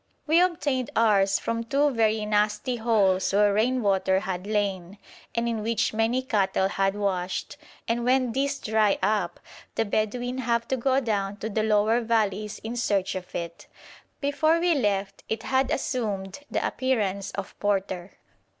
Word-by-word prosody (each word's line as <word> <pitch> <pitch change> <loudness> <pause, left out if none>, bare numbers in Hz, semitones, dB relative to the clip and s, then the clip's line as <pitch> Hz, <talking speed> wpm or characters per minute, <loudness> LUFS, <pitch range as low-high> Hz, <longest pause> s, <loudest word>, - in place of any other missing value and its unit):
We 320 +3 +4
obtained 290 -8 0
ours 200 -3 +4
from 230 0 -2
two 280 +5 +2
very 220 -3 +1
nasty 210 +4 0
holes 205 -5 +2
where 205 0 +4
rain 245 +4 +1
water 190 -1 +2
had 185 0 -4
lain, 200 -3 -2 0.4
and 235 0 0
in 230 -2 -1
which 225 +1 0
many 225 +4 +1
cattle 195 -5 +1
had 195 0 0
washed; 185 -3 -2 0.3
and 235 +1 0
when 255 0 +2
these 280 +3 0
dry 215 -4 +2
up 205 -5 0 0.4
the 225 - +1
Bedouin 245 +5 -1
have 235 -1 0
to 265 - +2
go 260 +2 +2
down 205 -4 -1
to 220 +1 -5
the 215 - 0
lower 215 +2 +3
valleys 215 -2 0
in 225 +2 -4
search 200 -5 0
of 185 -1 -7
it. 170 -1 -6 0.5
Before 310 +3 +2
we 345 0 +3
left 200 -7 -1
it 220 0 -2
had 265 0 +1
assumed 210 -6 -2
the - - -1
appearance 200 -7 -1
of 200 -1 -5
porter. 195 -2 -1
215 Hz, 160 wpm, -26 LUFS, 200-245 Hz, 0.5 s, We